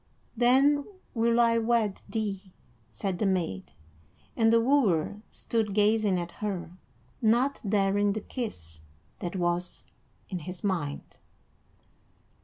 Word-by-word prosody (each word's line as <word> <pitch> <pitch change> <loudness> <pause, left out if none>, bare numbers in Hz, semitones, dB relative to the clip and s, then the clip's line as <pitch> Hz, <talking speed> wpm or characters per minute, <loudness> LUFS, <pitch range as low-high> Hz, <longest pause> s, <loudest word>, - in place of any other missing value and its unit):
"Then 270 +5 +4 0.3
will 235 0 +2
I 230 -1 +4
wed 225 -3 +1
thee," 200 -4 -4 0.4
said 175 - -3
the 210 - +2
maid, 170 - -2 0.6
and 225 -1 +4
the 230 - +5
wooer 215 - +2
stood 220 -4 -2
gazing 210 -2 +3
at 175 0 -5
her, 195 -5 -3 0.5
not 240 +5 +2
daring 200 0 +2
the 215 - -4
kiss 80 - -6 0.4
that 175 +1 -4
was 175 0 -2 0.4
in 185 - -4
his 180 +2 -8
mind. 170 -8 -3
205 Hz, 115 wpm, -28 LUFS, 180-230 Hz, 0.6 s, the